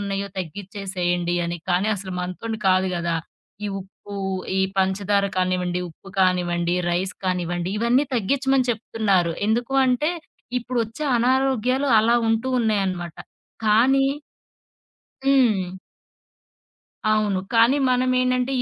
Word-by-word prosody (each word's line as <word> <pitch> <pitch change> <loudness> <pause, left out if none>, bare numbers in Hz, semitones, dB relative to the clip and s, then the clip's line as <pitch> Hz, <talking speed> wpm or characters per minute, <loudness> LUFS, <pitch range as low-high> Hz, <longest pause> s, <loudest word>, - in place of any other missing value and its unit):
ఉన్నాయో 200 0 -3
తగ్గిచ్చేసేయండి 180 -1 -3
అని. 170 +1 -3
కానీ, 185 +4 +2
అసలు 185 -1 -6
మనతోని 220 +5 -4
కాదు 185 0 +3
కదా! 170 -1 -1 0.5
ఈ - - -1
ఉప్పు, 200 +1 -12 0.4
ఈ - - +3 0.2
పంచదార 200 +1 +1
కానివ్వండి, 180 -1 0
ఉప్పు 185 +4 -15
కానివ్వండి, 175 -1 +1 0.2
రైస్ 180 +2 -1
కానివ్వండి, 175 -1 -1
ఇవన్నీ 245 +5 +3
తగ్గిచ్చమని 265 +3 +1
చెప్తున్నారు. 200 -6 0 0.2
ఎందుకు 240 +4 0
అంటే 260 +6 +2 0.5
ఇప్పుడొచ్చే 240 +3 -3
అనారోగ్యాలు 260 +1 +1
అలా 235 +2 +3
ఉంటూ 225 +3 0
ఉన్నాయనమాట. 190 -6 -1 0.5
కానీ 265 +6 +4 1.2
హ్మ్. 215 -10 +2 1.4
అవును. 205 -3 +1
కానీ, 230 +5 +5
మనమేంటంటే, 255 +1 +1
205 Hz, 105 wpm, -23 LUFS, 185-245 Hz, 1.4 s, కానీ